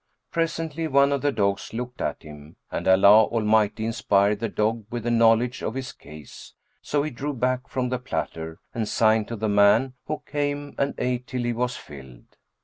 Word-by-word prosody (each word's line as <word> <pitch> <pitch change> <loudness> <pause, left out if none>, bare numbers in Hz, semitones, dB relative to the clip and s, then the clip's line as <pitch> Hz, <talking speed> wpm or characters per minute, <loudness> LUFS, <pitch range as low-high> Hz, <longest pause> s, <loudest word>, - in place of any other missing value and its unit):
Presently, 165 -1 -2
one 140 -1 +4
of 140 -2 0
the 145 - +1
dogs 100 -4 -1
looked 125 +1 -5
at - - -3
him 75 0 -12 0.2
and - - -3
Allah 100 +3 +7
Almighty 110 -1 +1
inspired 105 -3 +2
the 115 0 -2
dog 110 +2 -1
with 120 -2 -5
a 120 - +1
knowledge 115 +1 +3
of 110 - -3
his 130 -1 -4
case; 75 0 -13 0.3
so 145 -1 0
he 155 - -3
drew 140 +4 -4
back 130 +1 -1
from 125 -1 -2
the 125 0 -2
platter 80 -10 -4 0.2
and 110 -3 -2
signed 110 -1 +2
to 115 - -5
the 110 0 -2
man, 105 +5 +4
who 155 - -4
came 145 -1 -3
and 140 0 0
ate 125 0 -2
till 125 -1 -3
he 120 0 0
was 125 +2 -2
filled. 65 -4 -13
115 Hz, 190 wpm, -24 LUFS, 105-130 Hz, 0.3 s, Allah